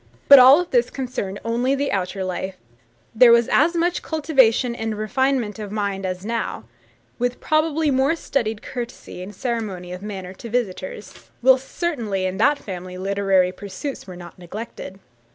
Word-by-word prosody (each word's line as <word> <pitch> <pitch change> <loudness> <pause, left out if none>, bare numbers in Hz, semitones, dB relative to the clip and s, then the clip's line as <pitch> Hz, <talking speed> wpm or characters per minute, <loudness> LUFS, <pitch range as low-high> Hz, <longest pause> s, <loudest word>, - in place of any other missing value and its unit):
But 280 -1 +11
all 275 +8 +7
this 245 -6 +1
concerned 245 -7 -4
only 245 +4 +1
the 280 +1 -1
outer 190 0 -2
life; 185 +1 -4 0.6
there 235 +1 +7
was 235 0 +5
as 335 +4 +3
much 345 +1 0
cultivation 265 -6 +2
and 225 -2 -4
refinement 230 +1 0
of 205 -2 -6
mind 200 -2 -2
as 185 +1 -5
now, 230 +1 -3 0.6
with 245 +1 -1
probably 310 -1 +1
more 270 +4 +2
studied 225 -9 -2
courtesy 240 -7 -7
and 190 +2 -9
ceremony 205 -6 -4
of 180 - -8
manner 190 -3 -6
to 230 +4 -10
visitors; 210 -3 -4
whilst 260 +1 +4
certainly 230 - -2
in 185 0 -2
that 285 +7 +3
family 185 -5 -7
literary 195 -1 +1
pursuits 205 +9 -7
were 185 - -8
not 175 0 -12
neglected. 190 +1 -8
225 Hz, 155 wpm, -22 LUFS, 190-265 Hz, 0.6 s, But